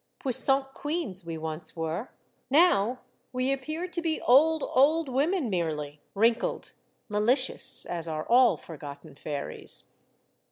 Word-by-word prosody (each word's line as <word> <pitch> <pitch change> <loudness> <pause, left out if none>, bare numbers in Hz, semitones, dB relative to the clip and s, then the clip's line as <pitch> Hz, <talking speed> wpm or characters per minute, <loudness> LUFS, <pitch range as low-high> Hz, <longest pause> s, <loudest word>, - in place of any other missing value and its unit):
Puissant 270 +1 0
queens 290 - -4
we 165 -1 -6
once 160 0 -6
were; 165 +6 -3 0.4
now 255 - +3 0.3
we 255 +1 0
appear 310 +6 -4
to 350 -1 -4
be 325 -2 -1
old, 310 +5 +4
old 305 +4 +3
women 285 +4 0
merely, 155 -6 -3
wrinkled, 225 +3 +1 0.4
malicious, 250 +5 +4
as 170 -1 -3
are 155 -1 -4
all 245 +1 +5
forgotten 145 -1 -10
fairies. 145 0 -5
245 Hz, 120 wpm, -27 LUFS, -, 0.4 s, all